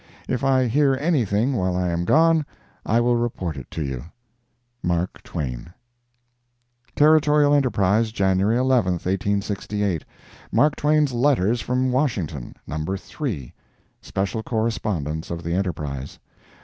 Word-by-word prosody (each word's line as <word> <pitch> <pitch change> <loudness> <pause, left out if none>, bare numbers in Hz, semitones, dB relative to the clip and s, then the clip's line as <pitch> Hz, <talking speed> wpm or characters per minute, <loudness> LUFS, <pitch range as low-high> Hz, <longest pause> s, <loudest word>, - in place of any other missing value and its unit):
If 130 +1 -2
I 130 -1 +3
hear 135 +3 +3
anything 130 - +1
while 95 -6 0
I 90 -1 0
am 85 0 -1
gone 160 - +4 0.4
I 115 - +3
will 120 0 +3
report 105 -9 -2
it - - -9
to 80 - -4
you. 65 -2 -5 0.8
MARK 85 +1 -1
TWAIN. 60 +3 -5 1.2
Territorial 150 -1 +5
Enterprise, 110 -5 +2
January 100 +1 +2
11, 125 -7 +2
1868 100 0 -1 0.5
MARK 150 0 +3
TWAIN'S 150 -2 +2
LETTERS 120 -3 +2
FROM 125 +3 0
WASHINGTON. 95 - -2
NUMBER 80 +5 -3
III. 95 - -5 0.5
(SPECIAL 100 +3 -2
CORRESPONDENCE 100 -9 -2
OF 85 0 -5
THE 85 +1 -2
ENTERPRISE.) 75 -7 -3
105 Hz, 120 wpm, -23 LUFS, 90-130 Hz, 1.2 s, Territorial